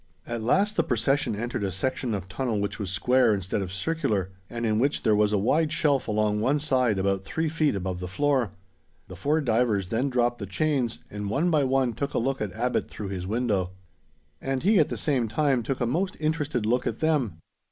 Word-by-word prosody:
At 120 -1 -4
last 195 - +2
the - - +4
procession 125 +1 +1
entered 120 +1 -3
a 95 - -1
section 115 +4 -1
of 95 -2 -5
tunnel 110 +2 -2
which 100 0 -3
was 100 -3 -3
square, 125 +3 +3
instead 95 +1 -2
of 95 -2 -4
circular, 100 - -1 0.2
and 120 0 -3
in 110 -1 +1
which 140 +4 +1
there 110 - +4
was 105 0 +3
a 105 - +2
wide 150 +10 +2
shelf 145 -4 +2
along 105 -1 +1
one 135 +6 +2
side 130 -7 +1
about 95 0 0
three 160 +11 -2
feet 155 -5 +1
above 95 -1 -3
the 90 - -4
floor. 130 +1 +1 0.6
The 95 - -8
four 145 - +1
divers 110 -7 +1
then 125 +5 0
dropped 120 -1 +1
the 100 - -5
chains, 130 +2 -1
and 105 -1 -4
one 160 - +1
by 150 -3 +3
one 130 -2 +1
took 140 +6 -3
a - - +2
look 135 +2 -1
at 105 -3 -2
Abbot 125 +5 -1
through 100 -2 -6
his 95 -2 -4
window. 100 -5 0 0.7
And 135 0 -2
he 205 +1 +5
at 155 - +3
the - - -3
same 130 -6 0
time 135 +2 +1
took 130 +4 -3
a 120 - +1
most 180 +10 -1
interested 150 -6 -1
look 125 +3 +1
at - - -3
them. 145 - +1
120 Hz, 215 wpm, -26 LUFS, 105-140 Hz, 0.7 s, he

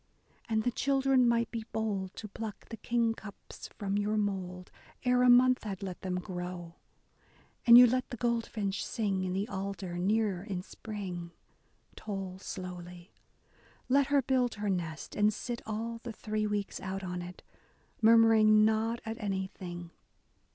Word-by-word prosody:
And 220 -1 +1
the 245 - +1
children 270 -1 +3
might 235 -1 +1
be 230 -1 -5
bold 200 -4 -2
to 215 - -7
pluck 215 0 -7
the 225 - -6
kingcups 225 -3 -3
from 200 0 -2
your 210 +1 0
mould 185 -3 -3 0.3
Ere 250 0 +4
a 250 - +6
month 250 +1 +6
had 200 -2 -5
let 185 -2 -6
them 185 -1 -2
grow. 175 -2 -6 0.9
And 235 0 +11
you 250 - +11
let 255 +2 +1
the 245 - -6
goldfinch 230 -4 -1
sing 195 -4 -1
in 185 -1 -2
the 195 +3 -1
alder 190 -4 -4
near 200 -1 +1
in 190 -3 -4
spring. 185 -6 -7 0.6
Toll 195 -3 -5
slowly. 180 -2 -8 0.8
Let 275 +1 +4
her 280 -1 +3
build 250 -1 +1
her 205 -1 -1
nest 165 -4 -4
and 210 0 +4
sit 235 +3 -5
all 230 +2 -3
the 240 - -6
three 215 -1 -2
weeks 205 -1 -2
out 190 +1 -4
on 180 -1 -4
it. 180 +1 -9 0.6
Murmuring 220 -1 +6
not 220 +2 +1
at 225 +1 -5
anything. 190 -3 -4
210 Hz, 150 wpm, -31 LUFS, 185-230 Hz, 0.9 s, And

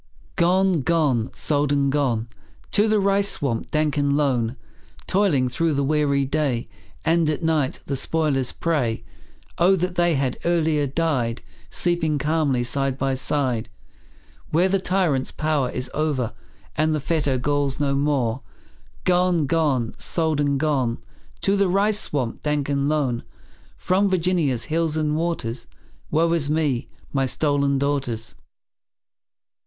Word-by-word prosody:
Gone, 185 -1 +3
gone, 135 -7 +1
sold 145 -1 0
and 140 -1 +2
gone, 125 -6 0 0.4
To 210 +1 +3
the 215 -1 +3
rice 200 0 +2
swamp 120 -5 -2
dank 150 -1 0
and 145 0 +2
lone; 125 -4 0 0.5
Toiling 180 -10 +2
through 160 +4 0
the 140 - +1
weary 140 -1 +1
day, 135 -4 -1 0.4
And 165 -1 +3
at 155 +2 -2
night 155 -5 0
the 140 - -2
spoiler's 135 -2 0
prey. 125 -9 -1 0.6
Oh, 180 +3 +5
that 180 0 -1
they 175 -2 +2
had 135 -2 -1
earlier 160 -4 +1
died, 130 -6 -1 0.3
Sleeping 170 -4 0
calmly, 150 -4 +1
side 135 +2 -1
by 135 -1 0
side, 130 -4 -1 0.8
Where 170 +4 +3
the 195 +1 +1
tyrant's 180 -8 0
power 150 -4 0
is 125 - -4
o'er, 145 -6 -1 0.4
And 155 +1 +2
the - - -1
fetter 145 -3 0
galls 140 +1 -1
no 140 -1 +1
more 135 -4 0 0.6
Gone, 180 -3 +2
gone, 135 -6 +1
sold 160 -3 0
and 140 -1 +1
gone, 135 -6 0 0.4
To 195 - +2
the 200 -1 +2
rice 205 +3 +2
swamp 130 - -2
dank 150 -2 -1
and 140 0 +1
lone, 135 -6 0 0.6
From 195 +2 +1
Virginia's 170 -9 +1
hills 160 0 -1
and 150 -1 0
waters; 130 -9 -2 0.4
Woe 165 +2 +2
is 150 -4 0
me, 150 -5 0 0.2
my 135 -1 +1
stolen 140 0 +1
daughters! 135 -5 -2
145 Hz, 140 wpm, -23 LUFS, 135-165 Hz, 0.8 s, Oh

